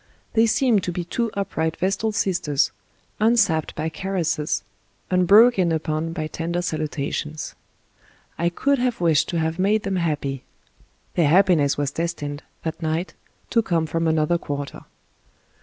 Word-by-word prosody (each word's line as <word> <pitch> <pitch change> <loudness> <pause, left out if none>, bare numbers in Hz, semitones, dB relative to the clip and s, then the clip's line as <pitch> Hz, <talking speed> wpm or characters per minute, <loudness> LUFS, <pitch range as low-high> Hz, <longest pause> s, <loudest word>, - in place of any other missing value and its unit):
They 230 0 +4
seemed 225 -2 +3
to 180 - -1
be 175 0 -3
two 230 +7 -1
upright 160 -5 -2
vestal 195 +4 0
sisters, 165 -8 +1 0.5
unsapped 210 -8 +2
by 155 +1 -2
caresses, 165 -2 -1 0.5
unbroke 200 +6 +6
in 175 -2 +3
upon 160 0 -1
by 160 -2 -3
tender 170 +3 -3
salutations. 155 -1 -3 0.8
I 170 - +1
could 280 +10 +1
have 245 -1 0
wished 165 -4 +3
to 170 - -1
have 160 +1 -1
made 205 +3 +2
them 195 -1 -1
happy. 145 -6 -2 0.7
Their 165 -4 +3
happiness 165 -4 +4
was 145 -1 -1
destined, 150 -3 -3 0.2
that 160 +1 -4
night, 160 +3 -2 0.4
to 230 - +4
come 170 -6 0
from 165 +1 -1
another 160 +2 +2
quarter. 145 -3 -5
170 Hz, 140 wpm, -23 LUFS, 155-195 Hz, 0.8 s, unbroke